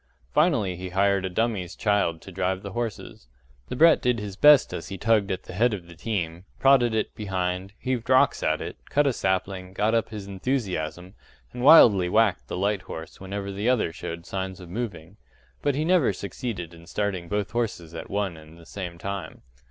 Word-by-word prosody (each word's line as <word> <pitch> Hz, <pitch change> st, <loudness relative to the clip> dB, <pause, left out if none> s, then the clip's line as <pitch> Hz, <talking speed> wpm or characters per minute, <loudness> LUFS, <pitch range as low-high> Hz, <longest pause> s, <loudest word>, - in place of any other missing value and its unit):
Finally 130 Hz, -, +2 dB
he 90 Hz, +1 st, -6 dB
hired 100 Hz, +1 st, +2 dB
a -, -, -2 dB
dummy's 95 Hz, -3 st, -1 dB
child 100 Hz, -6 st, 0 dB
to 95 Hz, -, -10 dB
drive 95 Hz, +1 st, -1 dB
the 100 Hz, -, -6 dB
horses. 110 Hz, -, -5 dB, 0.4 s
The -, -, -3 dB
brat 165 Hz, +4 st, +6 dB
did 125 Hz, -1 st, +2 dB
his 105 Hz, -3 st, -6 dB
best 150 Hz, +4 st, +6 dB, 0.2 s
he 95 Hz, -, -5 dB
tugged 105 Hz, 0 st, +2 dB
at 95 Hz, -, -3 dB
the -, -, -10 dB
head 115 Hz, +4 st, +2 dB
of 90 Hz, -4 st, -9 dB
the 85 Hz, -, -13 dB
team, 85 Hz, -2 st, -4 dB
prodded 125 Hz, -4 st, +4 dB
it 110 Hz, -, -1 dB
behind, 95 Hz, -1 st, -3 dB
heaved 125 Hz, -2 st, -3 dB
rocks 130 Hz, 0 st, +4 dB
at -, -, 0 dB
it, -, -, -6 dB
cut 145 Hz, +1 st, +3 dB
a 135 Hz, -, +2 dB
sapling, 95 Hz, -2 st, -2 dB
got 105 Hz, +3 st, +1 dB
up 115 Hz, -1 st, +1 dB
his 105 Hz, -3 st, -7 dB
enthusiasm, 95 Hz, -, -3 dB, 0.4 s
and 125 Hz, -, -6 dB
wildly 115 Hz, -, +7 dB
whacked 105 Hz, -1 st, +2 dB
the -, -, -4 dB
light 100 Hz, +1 st, 0 dB
horse 80 Hz, -2 st, -9 dB
whenever 100 Hz, +1 st, -5 dB
the 100 Hz, +5 st, -1 dB
other 115 Hz, -10 st, +1 dB
showed 85 Hz, 0 st, -7 dB
signs 95 Hz, -1 st, -4 dB
of 90 Hz, -2 st, -11 dB
moving 100 Hz, -3 st, -6 dB, 0.4 s
but 145 Hz, -2 st, +1 dB
he 150 Hz, +2 st, 0 dB
never 170 Hz, -, +3 dB
succeeded 100 Hz, -3 st, -5 dB
in 85 Hz, 0 st, -15 dB
starting 95 Hz, -3 st, -2 dB
both 105 Hz, +1 st, -2 dB
horses 105 Hz, -9 st, -3 dB
at 80 Hz, -, -7 dB
one 100 Hz, -3 st, -1 dB
and 80 Hz, +1 st, -14 dB
the 85 Hz, -, -15 dB
same 90 Hz, -3 st, -6 dB
time. 100 Hz, +2 st, -6 dB
100 Hz, 195 wpm, -25 LUFS, 90-115 Hz, 0.4 s, wildly